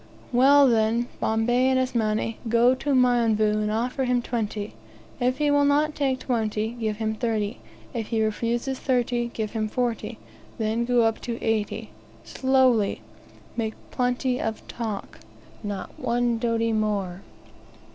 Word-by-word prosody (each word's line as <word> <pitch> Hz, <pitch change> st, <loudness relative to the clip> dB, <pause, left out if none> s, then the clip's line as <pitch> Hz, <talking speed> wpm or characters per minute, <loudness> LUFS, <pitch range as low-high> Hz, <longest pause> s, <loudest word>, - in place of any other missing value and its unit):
"Well, 275 Hz, +3 st, +6 dB
then, 230 Hz, 0 st, +2 dB
Bombay 240 Hz, +4 st, +2 dB
and 260 Hz, -, +3 dB
Asmani, 225 Hz, -3 st, 0 dB
go 235 Hz, +2 st, +5 dB
to 275 Hz, +2 st, -1 dB
Mionvu, 230 Hz, -4 st, +3 dB
and 210 Hz, -, 0 dB
offer 250 Hz, +4 st, -1 dB
him 250 Hz, -1 st, +2 dB
twenty. 215 Hz, -3 st, -3 dB, 0.5 s
If 250 Hz, +1 st, +1 dB
he 295 Hz, -1 st, +2 dB
will 285 Hz, 0 st, +4 dB
not 295 Hz, +2 st, +3 dB
take 270 Hz, -3 st, 0 dB
twenty, 220 Hz, -4 st, -1 dB
give 220 Hz, -3 st, -3 dB
him 220 Hz, -1 st, -1 dB
thirty. 220 Hz, -2 st, -2 dB, 0.3 s
If 225 Hz, -3 st, -3 dB
he 225 Hz, -2 st, 0 dB
refuses 235 Hz, +4 st, -1 dB
thirty, 245 Hz, -2 st, 0 dB
give 215 Hz, -2 st, -3 dB
him 215 Hz, -1 st, -1 dB
forty; 240 Hz, 0 st, -2 dB, 0.4 s
then 225 Hz, +2 st, 0 dB
go 245 Hz, -1 st, +3 dB
up 225 Hz, -1 st, +1 dB
to 235 Hz, -1 st, -4 dB
eighty, 220 Hz, 0 st, -2 dB, 0.3 s
slowly. 260 Hz, -5 st, +2 dB, 0.5 s
Make 220 Hz, -2 st, -2 dB, 0.2 s
plenty 250 Hz, 0 st, 0 dB
of 220 Hz, -1 st, -4 dB
talk; 220 Hz, -4 st, -5 dB, 0.4 s
not 205 Hz, -2 st, -5 dB
one 240 Hz, -1 st, 0 dB
doti 230 Hz, -1 st, 0 dB
more. 200 Hz, -4 st, -1 dB
235 Hz, 140 wpm, -25 LUFS, 220-250 Hz, 0.5 s, Well